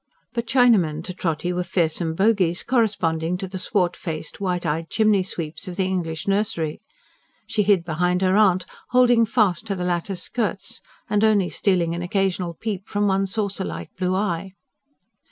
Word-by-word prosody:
But 235 -1 -3
Chinamen 210 - +3
to 185 - -6
Trotty 175 0 -2
were 180 - -1
fearsome 165 -2 0
bogies, 190 -3 +2
corresponding 180 -8 +1
to 190 0 -5
the 185 0 -6
swart 180 -1 0
faced, 160 +1 -6
white 180 -2 -1
eyed 160 +1 -2
chimney 215 -3 +3
sweeps 170 0 -5
of 180 - -5
the 190 - 0
English 165 -3 -3
nursery. 195 -6 -1 0.6
She 210 - 0
hid 200 -4 +3
behind 180 +3 0
her 185 0 +3
aunt, 185 -4 +4 0.2
holding 245 -2 +4
fast 210 -3 +1
to 200 - -1
the 180 -1 -3
latter's 180 +1 -2
skirts, 235 -3 -3 0.3
and 210 -2 +1
only 210 -4 +3
stealing 175 -4 +1
an 170 - -3
occasional 180 -1 -1
peep 200 0 -4
from 205 0 0
one 195 0 +2
saucer 200 0 -2
like 85 -1 -7
blue 185 0 0
eye. 190 -1 -2
185 Hz, 170 wpm, -23 LUFS, 170-205 Hz, 0.6 s, aunt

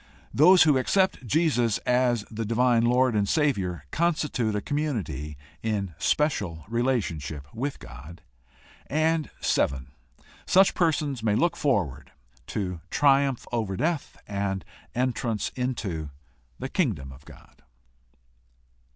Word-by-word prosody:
Those 180 +6 +7
who 150 -4 +4
accept 185 -2 +1
Jesus 125 -6 +2
as 125 -3 +2
the 115 +1 -3
divine 115 +1 +2
Lord 125 +1 +3
and 100 -1 +1
Savior 100 - 0
constitute 150 -10 0
a - - +1
community 100 - -3 0.2
in 100 -5 -2
special 100 - 0
relationship 105 - -1
with 135 +5 -3
God. 70 +8 -12 0.7
7. 155 - 0 0.6
Such 190 +1 +5
persons 150 -7 0
may 110 -2 +1
look 170 +8 +2
forward 75 - -1 0.4
to 90 -5 -3
triumph 140 -3 +3
over 110 -6 -2
death 160 -2 -2
and 100 -2 -2 0.3
entrance 120 -3 -1
into 105 - -3 0.5
the - - -4
Kingdom 100 - -1
of 65 +2 -14
God. - - -17
115 Hz, 110 wpm, -26 LUFS, 95-145 Hz, 0.7 s, Those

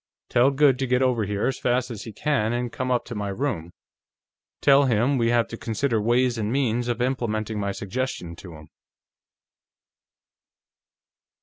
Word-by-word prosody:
Tell 120 +3 +4
Goode 140 -2 +3
to 135 - -1
get 125 +1 +2
over 120 -4 +1
here 100 +1 -2
as 130 - -1
fast 125 +1 0
as 110 - -7
he 115 - -7
can, 115 -1 0
and 120 0 -2
come 130 0 -3
up 125 -1 +1
to 120 - -7
my 105 -2 -3
room; 100 - -3 0.9
tell 140 0 +5
him 125 +3 +2
we 115 0 +2
have 120 -1 +2
to 115 - -6
consider 115 0 -1
ways 120 +2 +2
and 105 0 -1
means 120 -3 0
of 120 0 -1
implementing 110 -4 -2
my 100 -1 -1
suggestion 100 -4 -4
to 85 -4 -11
him." 75 0 -14
120 Hz, 170 wpm, -24 LUFS, 105-130 Hz, 0.9 s, tell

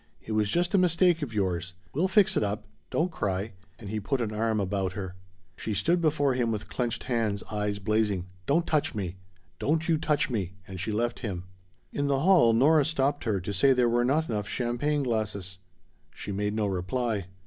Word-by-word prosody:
It - - -7
was 105 -1 +1
just 175 - +1
a 195 - +5
mistake 175 -1 +3
of 140 -6 -3
yours. 90 -4 -1 0.2
We'll 170 +7 +2
fix 200 0 +4
it - - +2
up. 105 0 -2 0.2
Don't 175 +3 0
cry." 100 - -2 0.2
And 105 -3 -8
he 110 - -1
put 130 +6 -1
an 110 -3 -2
arm 110 0 0
about 95 -1 -1
her. 95 -2 -5 0.4
She 110 +2 -3
stood 170 - +2
before 145 -4 +2
him 120 -2 0
with 105 -2 -4
clenched 120 -2 -2
hands, 110 -5 -1
eyes 105 -1 -1
blazing. 105 -2 0 0.2
"Don't 165 +4 +3
touch 155 -7 0
me! 95 -3 -3 0.4
Don't 160 +3 0
you 160 -2 +2
touch 150 -2 +1
me!" 95 -7 -3
And 95 -1 -7
she 95 +5 -2
left 120 +3 -1
him. 95 -7 -4 0.5
In 145 0 0
the 135 -1 +1
hall 170 -9 +6
Nora 145 +7 +5
stopped 145 -3 0
her 105 -4 +1
to 100 +3 -4
say 135 +8 +5
there 125 -1 +3
were 120 +1 +2
not 150 +6 +2
enough 105 -2 -2
champagne 130 +4 0
glasses. 105 -6 -2 0.6
She - - -6
made 105 +1 -1
no 110 -1 +1
reply. 100 +2 -1
115 Hz, 200 wpm, -28 LUFS, 100-145 Hz, 0.6 s, hall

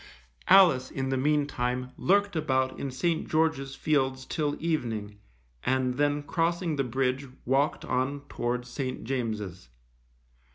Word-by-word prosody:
Alice, 135 -10 +6
in 135 -1 -3
the 135 - +1
meantime, 130 -3 0
lurked 200 +1 +2
about 130 -4 0
in 140 - -3
St. 160 +6 -1
George's 155 -4 +1
Fields 130 -3 0
till 150 -2 -1
evening, 115 -11 -2 0.4
and 130 -1 +1
then 145 +2 +1
crossing 170 +1 0
the 140 - +1
bridge, 130 +2 -1 0.2
walked 135 +4 +1
on 130 +3 -1
towards 120 +1 -2
St. 130 0 -4
James's. 110 - -3
135 Hz, 125 wpm, -28 LUFS, 125-150 Hz, 0.4 s, Alice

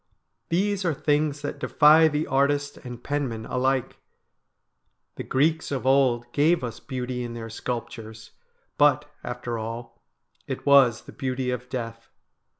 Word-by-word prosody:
These 195 +3 0
are 170 -4 0
things 145 0 0
that 145 - -4
defy 155 +2 +6
the 150 0 -1
artist 140 +1 +1
and 125 -2 -9
penman 130 -6 -2
alike. 130 0 -1 1.2
The - - -6
Greeks 160 +4 +1
of 135 -3 -3
old 130 -3 +3
gave 155 +2 +3
us 120 -2 -5
beauty 125 -1 -4
in 120 -1 -6
their 115 -1 -7
sculptures, 110 -2 -6 0.5
but, 145 0 +4 0.2
after 120 -1 -4
all, 115 +2 -7 0.5
it - - -5
was 135 -5 +5
the - - -12
beauty 130 -1 -2
of 125 0 -5
death. 115 -2 -6
130 Hz, 140 wpm, -25 LUFS, 120-145 Hz, 1.2 s, defy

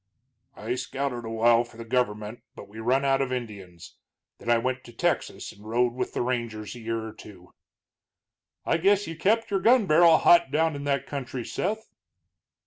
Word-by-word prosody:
"I 115 +3 -3
scouted 130 -1 -3
a - - -5
while 115 +1 +4
for 120 -1 -16
the 115 - -8
gover'ment, 110 -2 -2
but 100 - -10
we 105 +2 -11
run 130 +5 +1
out 135 0 +2
of 135 -2 -2
Indians. 100 -9 -7 0.4
Then - - -7
I 120 - +5
went 130 +2 -2
to 120 - -11
Texas 115 - -2
and 100 - -17
rode 120 +2 +1
with 125 - -4
the - - 0
rangers 115 -4 -3
a 120 - -10
year 115 0 -3
or 110 - -8
two." 90 -4 -14 1.1
"I - - +2
guess 200 +4 +3
you 165 - -6
kept 215 +7 +1
your 195 - +2
gun 235 +2 +4
barrel 165 -1 +6
hot 170 -4 +5
down 160 +2 +1
in 140 0 -6
that 140 -1 0
country, 130 -3 -5
Seth?" 220 +4 -3
125 Hz, 190 wpm, -26 LUFS, 115-150 Hz, 1.1 s, barrel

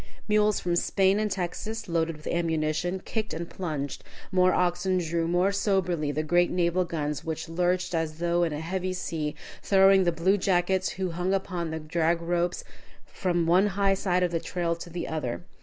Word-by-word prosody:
Mules 210 -1 +3
from 175 -1 -1
Spain 195 +3 +2
and 215 0 0
Texas, 200 +4 -4
loaded 165 -2 0
with 155 - -16
ammunition, 165 +2 -1
kicked 220 -5 -3
and 170 +1 -4
plunged, 150 -7 -4 0.3
more 185 -1 +4
oxen 180 +1 +1
drew 165 -1 -1
more 175 +3 +2
soberly 180 -7 0
the 155 +2 -1
great 175 +3 +3
naval 180 0 +1
guns, 150 -3 -3
which 160 -1 -4
lurched 180 +2 0
as 160 -2 -1
though 175 +1 +1
in 170 -2 +1
a 150 +1 -4
heavy 185 +2 -2
sea, 160 -4 -3 0.3
throwing 195 -1 +5
the 175 - +2
blue 175 +5 +2
jackets 185 0 +1
who 190 -2 -2
hung 180 +3 0
upon 180 -3 -3
the 160 - -3
drag 165 +2 0
ropes 175 +1 -1 0.4
from 175 -3 -1
one 180 +5 +4
high 195 -1 +3
side 180 -2 +1
of 175 - +1
the 165 - 0
trail 170 0 -2
to 170 +1 -9
the 170 +1 -4
other. 155 0 -3
175 Hz, 185 wpm, -27 LUFS, 165-185 Hz, 0.4 s, throwing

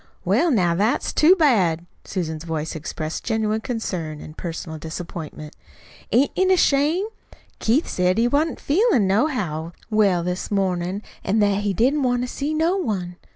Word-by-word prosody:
"Well, 345 - +3
now, 185 - +3
that's 205 +7 0
too 335 +5 +6
bad!" 190 - +2 0.2
Susan's 160 -4 -3
voice 160 -1 -3
expressed 155 0 -5
genuine 220 -1 0
concern 180 - -4
and 155 - -10
personal 165 -2 -6
disappointment. 160 -1 -7 0.6
"Ain't 265 +4 +3
it 375 0 +2
a 375 - +5
shame? 305 +5 +3 0.5
Keith 250 +9 +2
said 180 +1 +1
he 230 +1 +3
wa'n't 295 +5 0
feelin' 345 - +3
nohow 190 - 0 0.2
well 200 -5 +3
this 180 +1 -3
mornin', 190 0 -1 0.2
an' 210 - 0
that 205 -2 +3
he 205 -1 0
didn't 270 - +2
want 245 -1 +1
to - - -2
see 285 +4 -3
no 325 +4 +1
one. 185 - -3
205 Hz, 155 wpm, -22 LUFS, 170-275 Hz, 0.6 s, too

